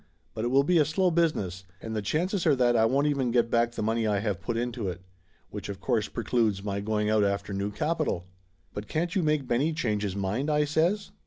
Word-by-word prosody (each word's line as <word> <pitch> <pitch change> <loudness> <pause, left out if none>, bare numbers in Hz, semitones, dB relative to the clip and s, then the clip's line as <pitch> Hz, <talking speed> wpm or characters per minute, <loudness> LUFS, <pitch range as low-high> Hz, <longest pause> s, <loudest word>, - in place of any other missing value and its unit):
But 110 +1 -3
it - - +1
will 135 +3 +4
be 170 +3 +3
a - - +6
slow 175 +5 +1
business, 130 - 0 0.2
and 110 +3 -6
the 105 - -1
chances 175 - 0
are 150 - +5
that 120 -2 +3
I 110 -1 +4
won't 135 +5 +2
even 140 -4 +1
get 120 -1 +2
back 120 0 +2
the - - -3
money 110 +1 0
I 105 -1 +1
have 100 -2 -2
put 115 +3 -2
into 120 -3 -2
it. 90 0 -7 0.5
Which - - -6
of 100 -1 -5
course 110 +2 0
precludes 110 -4 0
my 100 -1 -2
going 105 +1 -1
out 110 -1 +3
after 100 0 -1
new 100 +1 -2
capital." 110 - -1 0.5
"But 105 +1 -6
can't 170 +6 -1
you 195 - +1
make 150 -4 0
Benny 140 +8 +1
change 110 -9 -1
his 100 -2 -2
mind?" 100 +9 -1
I 150 0 +2
says. 170 +8 0
120 Hz, 235 wpm, -27 LUFS, 105-150 Hz, 0.5 s, a